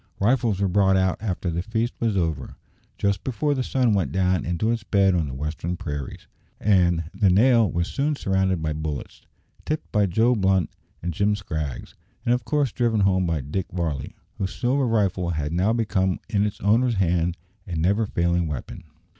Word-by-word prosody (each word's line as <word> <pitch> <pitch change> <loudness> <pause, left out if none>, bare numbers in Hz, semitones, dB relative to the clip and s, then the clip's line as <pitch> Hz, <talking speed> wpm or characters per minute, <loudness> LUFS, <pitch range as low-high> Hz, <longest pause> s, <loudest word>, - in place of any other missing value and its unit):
Rifles 115 -2 +2
were 100 - +2
brought 95 0 +3
out 95 -1 +1
after 95 -4 -2
the 85 +1 -1
feast 110 +5 -2
was 110 -4 0
over, 80 -7 -2 0.4
just 100 -2 0
before 145 +3 0
the 130 - -1
sun 125 -3 +1
went 90 -9 0
down 90 0 +1
into 90 +6 0
its 115 -1 -2
bed 100 -2 +3
on 85 -4 0
the 65 - -6
western 80 +5 -3
prairies, 75 -7 -6 0.3
and 90 -5 +3
"the 100 0 +3
nail" 115 +2 +4
was 85 +1 -1
soon 145 +2 -1
surrounded 95 - 0
by 80 -1 -1
bullets, 75 -2 -5 0.4
tipped 155 0 -3
by 105 -2 +3
Joe 110 +7 +3
Blunt 95 -5 +1 0.3
and 90 0 -2
Jim 100 +5 +1
Scraggs, 80 -9 -5 0.3
and 120 - +3
of 125 -2 -1
course 145 -2 +1
driven 115 -3 +1
home 95 -2 +2
by 80 -3 0
Dick 75 +8 -3
Varley, 80 -7 -3 0.2
whose 95 -2 -3
"silver 130 +2 +1
rifle" 95 -6 +1
had 75 -2 -2
now 95 +5 +2
become 105 -5 0
in 105 0 +1
its 105 - -6
owner's 115 +4 +3
hand 85 -2 +1 0.3
a 90 - -4
never 100 +7 +1
failing 85 -2 0
weapon. 75 +2 -6
95 Hz, 185 wpm, -24 LUFS, 85-110 Hz, 0.4 s, nail